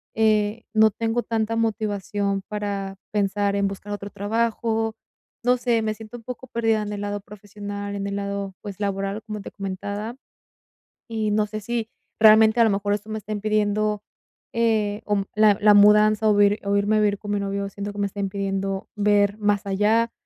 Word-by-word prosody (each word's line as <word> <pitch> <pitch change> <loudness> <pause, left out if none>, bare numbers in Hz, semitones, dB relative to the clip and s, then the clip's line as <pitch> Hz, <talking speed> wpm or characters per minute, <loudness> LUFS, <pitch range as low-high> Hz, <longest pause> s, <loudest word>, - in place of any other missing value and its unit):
eh, 215 0 +2
no 220 0 +5
tengo 230 +3 -1
tanta 225 0 -1
motivación 205 -3 -1
para 200 -2 -4
pensar 200 0 0
en 200 0 +2
buscar 200 +1 -6
otro 205 0 -6
trabajo, 225 +1 -1 0.5
no 250 +1 +3
sé, 235 -2 +1
me 215 -1 -1
siento 225 +2 -10
un 230 - -14
poco 250 +1 -7
perdida 225 -3 +1
en 210 0 -4
el 205 - -5
lado 205 0 -3
profesional, 205 0 -7
en 200 0 -3
el 200 - -3
lado, 200 -1 -3
pues, 205 -1 -8
laboral, 200 +1 -2
como 210 -2 -5
te - - -8
comentaba, 205 +3 -5 0.9
y 220 -2 -1
no 210 0 +2
sé 215 0 -6
si 230 0 -2 0.3
realmente 220 +1 +7
a - - +8
lo - - +3
mejor 205 +1 0
esto 210 +1 -4
me 220 - -3
está 215 0 -10
impidiendo, 210 0 0 0.5
eh, 220 -3 +1
o 205 -2 +1
la 210 -2 +5
la 210 0 +7
mudanza 210 +1 +6
o - - +5
o 205 - +4 0.4
irme 205 +2 +2
a - - +3
vivir 205 -1 +2
con 205 -1 -6
mi 205 - +1
novio, 200 0 -2
siento 200 +1 -5
que 205 - -7
me 200 - +1
está 200 - -9
impidiendo 195 0 -2
ver 205 0 +2
más 205 -1 +1
allá, 215 +4 +2
210 Hz, 185 wpm, -24 LUFS, 200-220 Hz, 0.9 s, a